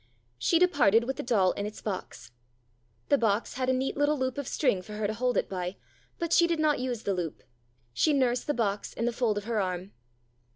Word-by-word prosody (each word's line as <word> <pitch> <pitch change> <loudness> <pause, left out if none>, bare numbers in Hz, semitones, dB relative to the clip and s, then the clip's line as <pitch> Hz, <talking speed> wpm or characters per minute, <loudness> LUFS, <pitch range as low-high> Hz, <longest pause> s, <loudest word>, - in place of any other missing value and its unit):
She 335 - +3
departed 285 - +4
with 265 +2 -3
the - - -2
doll 205 -7 +2
in 205 - -3
its 215 - -8
box. 180 - -6 0.8
The 285 - +4
box 220 -1 +1
had 255 0 -1
a - - +5
neat 260 +1 -1
little 290 +1 +2
loop 260 0 -2
of 280 - -4
string 250 -11 +1
for 210 +3 -10
her 210 0 -2
to 210 - 0
hold 250 +2 0
it - - +1
by, 180 0 -4 0.4
but 335 -1 -1
she 340 - +6
did 335 -2 0
not 305 -3 +2
use 245 -3 -3
the 200 - 0
loop. 175 -4 -4 0.5
She 310 - +3
nursed 255 -4 +1
the 295 - 0
box 205 -3 -1
in 230 - -2
the 240 - 0
fold 230 -3 0
of 205 - -3
her 225 0 -1
arm. 185 +1 -3
235 Hz, 225 wpm, -28 LUFS, 200-270 Hz, 0.8 s, she